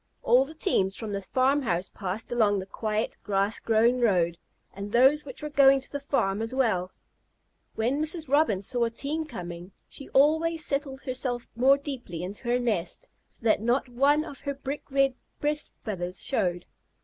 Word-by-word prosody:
All 255 +2 +5
the 315 +3 -10
teams 195 - +1
from 220 -2 -5
the 200 - -2
farm 265 +8 +2
house 180 -7 -1
passed 200 +4 -5
along 215 -4 +3
the 190 - -4
quiet, 215 +2 -3
grass 200 +2 0
grown 230 +3 +3
road, 175 -7 +2 0.3
and 200 +1 -7
those 270 +6 +4
which 265 +1 -10
were 300 - -3
going 275 -1 +6
to 265 - -10
the 285 - -3
farm 220 -8 0
as 225 +3 -3
well. 185 -9 +1 0.8
When 245 +7 0
Mrs. 315 0 -1
Robin 265 -9 +2
saw 240 +3 +1
a - - -1
team 290 +7 -3
coming, 180 - -8
she 275 - -11
always 320 +3 +3
settled 275 -1 -2
herself 250 -2 -1
more 265 +4 +5
deeply 250 - -6
into 200 +6 -7
her 240 +1 +2
nest, 215 -9 -2 0.2
so - - -7
that 220 -2 +3
not 245 +3 +1
one 285 +5 +3
of 280 - -10
her 280 -1 -4
brick 275 +1 -5
red 275 -1 +2 0.3
breast 295 0 -2
feathers 180 -4 -4
showed. 180 -9 -1
245 Hz, 180 wpm, -27 LUFS, 200-280 Hz, 0.8 s, going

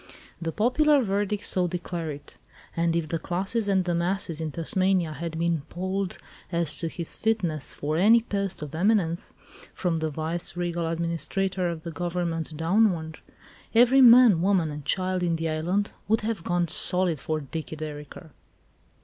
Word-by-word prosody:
The 165 -1 -2
popular 275 - +3
verdict 205 0 -1
so 180 -1 +1
declared 170 -3 -4
it. 145 - -16 0.4
And 170 0 +1
if 170 -2 0
the 165 - -1
"classes 195 +7 -1
and 190 -2 +2
the 175 - 0
masses" 170 -1 -1
in 160 - -2
Tasmania 175 +1 0
had 160 +2 -5
been 170 -2 0
polled 185 +1 -3 0.3
as 170 -3 0
to 165 - -2
his 165 0 -6
fitness 180 -10 0
for 150 +2 -2
any 225 +6 +5
post 200 -7 -3
of 150 0 -8
eminence, 175 -1 0 0.4
from 175 -2 0
the 160 0 -1
vice 160 +4 -3
regal 175 -1 -1
administrator 175 +3 -1
of 165 -2 -5
the 170 - -5
government 165 -1 -3
downward, 165 -2 +1 0.6
every 245 +3 +6
man, 235 -7 +8
woman 180 -4 +2
and 145 -1 -7
child 185 -1 0
in 170 -2 +1
the 165 0 -2
island 180 +6 -1 0.2
would 220 +2 +2
have 215 -5 -3
gone 175 -1 0
"solid" 180 -1 +1
for 155 0 -2
"Dicky 155 +2 -6
Dereker." 150 +1 -8
175 Hz, 160 wpm, -26 LUFS, 160-195 Hz, 0.6 s, man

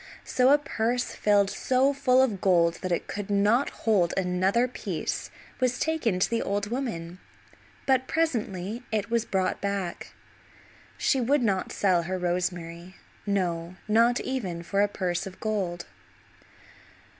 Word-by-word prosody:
So 255 0 +3
a 290 - +7
purse 245 -4 -1
filled 200 -1 +3
so 260 +2 +2
full 260 -2 +4
of 215 -8 -1
gold 170 -3 +3
that 185 - -3
it 170 - 0
could 205 -1 -5
not 205 +6 +3 0.2
hold 195 -6 +3
another 190 +6 +2
piece 250 - -4 0.3
was 250 -1 +1
taken 305 -12 0
to 185 - +2
the 230 0 -1
old 205 +2 -2
woman; 185 -9 -4 0.7
but 260 -1 +2
presently 225 - -1
it 220 0 -1
was 235 -1 +1
brought 190 -3 -1
back. 200 -3 -3 0.8
She 270 - +2
would 270 +2 +2
not 195 -4 0
sell 185 -4 +2
her 185 +2 -3
rosemary; 175 0 -3 0.3
no, 175 -3 -1
not 230 +3 +4
even 190 -11 -3
for 195 +3 0
a 205 - +4
purse 185 -1 -2
of 190 - -11
gold. 190 -6 -2
200 Hz, 145 wpm, -27 LUFS, 180-245 Hz, 0.8 s, a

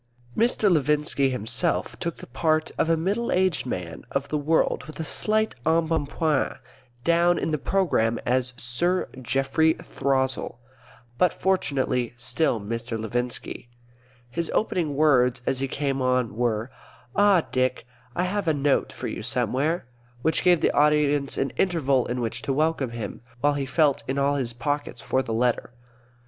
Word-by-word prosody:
Mr. 230 -2 +2
Levinski 150 -4 +2
himself 125 -4 -1
took 170 -1 -3
the - - -10
part 155 +4 0
of 160 - +1
a 165 - +3
middle 200 +8 -1
aged 185 -7 +1
man 90 -7 -5
of 140 +1 -2
the 150 - 0
world 155 -3 +1
with 155 0 -11
a - - -1
slight 215 +7 0
embonpoint; 160 -1 +1 0.5
down 170 +2 +3
in - - -1
the 155 - +1
programme 140 -11 +1
as 125 0 +1
Sir 175 +10 0
Geoffrey 135 +6 +2
Throssell, 130 -3 -1 0.6
but 180 - +4
fortunately 130 -10 0
still 120 +1 +1
Mr. 115 +2 -4
Levinski. 120 +2 -4 0.6
His 165 +7 -3
opening 170 -9 0
words, 125 -5 +3
as 135 -1 0
he 135 - -1
came 135 0 -2
on, 125 -4 +1
were, 115 0 -1 0.4
"Ah, 200 -4 +5
Dick, 130 -2 0 0.3
I 180 - +1
have 195 0 -2
a 160 - +3
note 140 0 +1
for - - -5
you - - -5
somewhere," 150 +6 0 0.4
which 160 - +2
gave 175 -3 +4
the - - +3
audience 145 -1 +2
an 135 - 0
interval 140 -9 +2
in 125 +1 -2
which 115 +1 -3
to 135 - -1
welcome 155 -2 +1
him, 115 -4 -6 0.2
while 145 +1 +3
he 140 -1 -2
felt 145 0 +2
in 130 - -2
all 140 +1 +2
his 130 -4 -1
pockets 145 +2 -3
for 130 - 0
the 115 - -5
letter. 120 +1 0
140 Hz, 160 wpm, -25 LUFS, 125-160 Hz, 0.6 s, Ah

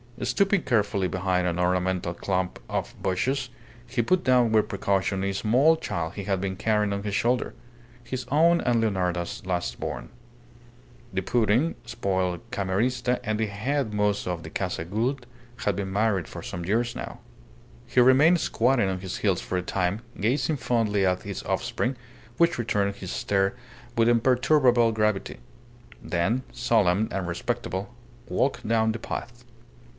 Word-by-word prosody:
Stooping 195 +9 +2
carefully 105 -5 +1
behind 90 0 0
an 85 -1 -1
ornamental 90 -1 0
clump 90 -2 -2
of - - -2
bushes, 125 +8 0 0.4
he 120 0 0
put 180 +10 +1
down 125 -3 +4
with 110 -1 +3
precaution 95 0 0
a 100 0 0
small 125 +11 +4
child 85 - -3
he 100 - -6
had 95 -1 0
been 95 -1 -2
carrying 105 0 +1
on 100 - -2
his 105 -1 -2
shoulder 120 +3 0 0.5
his 130 0 -5
own 170 +4 +4
and 120 -2 +2
Leonarda's 90 -5 -1
last 90 -2 -2
born. - - -5 1.0
The 95 - 0
pouting, 120 - +2
spoiled 95 -5 -1
Camerista 125 +4 0
and 110 +1 -1
the 110 - +1
head 110 +4 -2
mozo 105 -3 0
of 85 -2 -5
the - - -9
Casa 80 - -3
Gould 120 +8 -1 0.3
had 105 - 0
been 95 -1 -3
married 100 -4 +1
for - - -8
some 85 -1 -5
years 115 +5 0
now. - - -6 0.7
He - - +1
remained 140 +8 +6
squatting 120 -7 +2
on 95 -1 -2
his 95 0 -5
heels 95 -4 +1
for 90 - -3
a - - 0
time, 95 +3 -1 0.2
gazing 135 +8 +1
fondly 115 -5 +1
at 90 0 +1
his - - -5
offspring, 130 +2 -1 0.4
which 170 +1 +3
returned 100 -4 0
his 95 -1 -6
stare 95 +2 0 0.4
with 115 -1 +4
imperturbable 125 0 +4
gravity; 105 -2 0 0.6
then, 90 +9 0
solemn 110 -4 +2
and 95 -2 -2
respectable, 95 +5 -3 0.3
walked 135 - 0
down 110 0 +3
the 110 - -5
path. 120 +2 -6
105 Hz, 155 wpm, -26 LUFS, 95-125 Hz, 1.0 s, remained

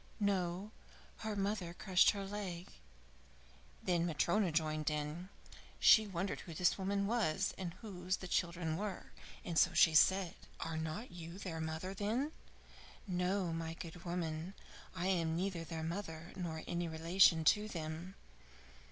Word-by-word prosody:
"No, 195 -1 0 0.5
her 220 -1 -3
mother 195 -3 -2
crushed 185 -2 +5
her 200 -1 -1
leg." 195 -3 -5 1.1
Then 175 -1 +2
Matryona 175 +4 +2
joined 155 -1 0
in. 150 +4 -3 0.5
She 220 -1 +7
wondered 190 0 -2
who 165 - -8
this 180 +3 +3
woman 200 +1 0
was, 210 -8 +1
and 175 -3 -5
whose 185 -3 -2
the 185 - -7
children 170 -2 0
were, 205 -2 -5 0.4
so 175 +2 +4
she 165 -1 +7
said: 185 +3 +5 0.3
"Are 165 0 -3
not 160 +9 -4
you 170 0 -8
their 175 -5 -4
mother 160 +4 -3
then?" 225 +9 -1 0.7
"No, 180 -1 0
my 165 0 -3
good 170 +1 -8
woman; 170 +1 -3 0.4
I 175 - -2
am 170 -4 +1
neither 180 -1 -1
their 165 -1 -5
mother 165 -1 -5
nor 165 -4 -4
any 170 0 -2
relation 165 +1 +4
to 210 +7 +4
them. 165 0 -5
175 Hz, 140 wpm, -36 LUFS, 165-195 Hz, 1.1 s, She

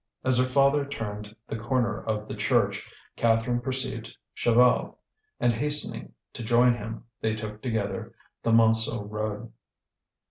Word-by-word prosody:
As 130 -1 +3
her 130 - +4
father 140 +2 +3
turned 105 -6 -6
the 110 - -4
corner 120 -1 -1
of 105 -1 -3
the - - -5
church, - - 0 0.3
Catherine 115 +1 +1
perceived 130 +1 -3 0.2
Chaval, 120 +1 +3 0.4
and, 120 - +3
hastening 150 +6 -2 0.2
to - - -6
join 120 +2 +4
him, 115 0 -7 0.2
they 110 0 0
took 105 -1 -7
together 110 -1 -3 0.3
the - - -1
Montsou 115 -2 +4
road. 105 +1 -4
115 Hz, 135 wpm, -27 LUFS, 110-125 Hz, 0.4 s, her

